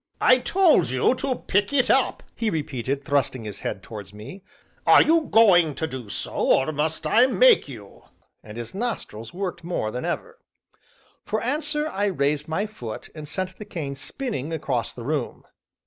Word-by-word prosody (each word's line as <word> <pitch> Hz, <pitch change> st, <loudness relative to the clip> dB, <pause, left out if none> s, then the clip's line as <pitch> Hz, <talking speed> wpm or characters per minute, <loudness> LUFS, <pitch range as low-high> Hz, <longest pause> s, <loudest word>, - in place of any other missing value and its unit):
'" -, -, -28 dB
"I 255 Hz, -, +4 dB
told 320 Hz, -, +3 dB
you 130 Hz, -, +2 dB
to 260 Hz, 0 st, -2 dB
pick 200 Hz, -1 st, 0 dB
it 265 Hz, -3 st, +3 dB
up," 265 Hz, -, +1 dB
he 225 Hz, -2 st, -1 dB
repeated, 140 Hz, -, -3 dB
thrusting 130 Hz, -4 st, 0 dB
his 105 Hz, -2 st, -7 dB
head 95 Hz, -, -4 dB
towards 105 Hz, -2 st, -9 dB
me; 150 Hz, -, -10 dB, 0.4 s
"are -, -, +8 dB
you 325 Hz, 0 st, +3 dB
going 175 Hz, -9 st, +5 dB
to 160 Hz, -, -2 dB
do 130 Hz, -8 st, -7 dB
so, -, -, -3 dB
or 135 Hz, +4 st, +2 dB
must 155 Hz, +2 st, -1 dB
I 245 Hz, +3 st, +5 dB
make -, -, +5 dB
you?" 110 Hz, -8 st, -12 dB, 0.4 s
and 105 Hz, +1 st, -10 dB
his 120 Hz, -1 st, -6 dB
nostrils 190 Hz, -, -4 dB
worked 185 Hz, -2 st, -5 dB
more 165 Hz, -11 st, -2 dB
than 125 Hz, -, -4 dB
ever. 475 Hz, -, -4 dB, 0.8 s
For 215 Hz, -, -2 dB
answer 300 Hz, +4 st, -1 dB
I 205 Hz, -8 st, -1 dB
raised 150 Hz, -5 st, 0 dB
my 160 Hz, +6 st, -1 dB
foot 120 Hz, -, -8 dB
and 155 Hz, -2 st, -8 dB
sent 185 Hz, +4 st, -4 dB
the -, -, -5 dB
cane 145 Hz, -7 st, -5 dB
spinning 150 Hz, -, -4 dB
across 135 Hz, -7 st, -2 dB
the 120 Hz, -, -9 dB
room. 150 Hz, +4 st, -3 dB
160 Hz, 180 wpm, -24 LUFS, -, 0.8 s, are